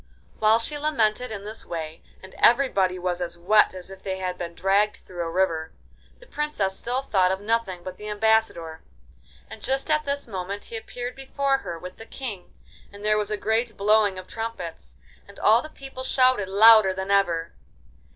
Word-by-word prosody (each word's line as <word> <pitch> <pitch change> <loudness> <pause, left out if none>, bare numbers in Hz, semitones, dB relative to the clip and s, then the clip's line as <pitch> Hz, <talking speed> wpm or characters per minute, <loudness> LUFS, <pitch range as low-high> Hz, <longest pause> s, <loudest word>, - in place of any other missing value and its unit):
While 220 +1 +5
she 290 +6 -3
lamented 250 -5 +1
in 205 -2 -6
this 215 +2 -7
way, 160 -1 -6 0.2
and 190 - -12
everybody 200 -8 +4
was 180 0 -2
as 170 -1 -3
wet 195 +3 +4
as 185 +1 -7
if 190 0 -11
they 190 -1 -3
had 185 -1 -3
been 170 -1 -6
dragged 200 +3 +2
through 175 -2 -8
a 165 - -2
river, 165 -3 0 0.5
the - - -16
Princess 300 - -2
still 250 +5 -2
thought 185 -7 +2
of 190 - -1
nothing 205 -4 -1
but 185 0 -7
the 210 - -8
ambassador, 210 -7 +1 0.7
and 220 - -11
just 270 +5 -1
at 305 0 +2
this 280 -1 -3
moment 200 -1 -5
he 230 - -8
appeared 245 +2 -6
before 270 0 0
her, 170 -10 -6
with 180 +2 -9
the 225 - -11
King, 220 -9 -7 0.4
and 205 +1 -10
there 215 0 +3
was 210 -1 -2
a 210 - -1
great 225 +3 -1
blowing 205 -1 +3
of 185 - -7
trumpets, 180 - -6 0.3
and 200 - -15
all 225 +3 +5
the 310 - -9
people 270 -3 -9
shouted 255 -7 +2
louder 210 -1 +7
than 190 +1 -3
ever. 175 -5 +1
205 Hz, 190 wpm, -25 LUFS, 185-230 Hz, 0.7 s, louder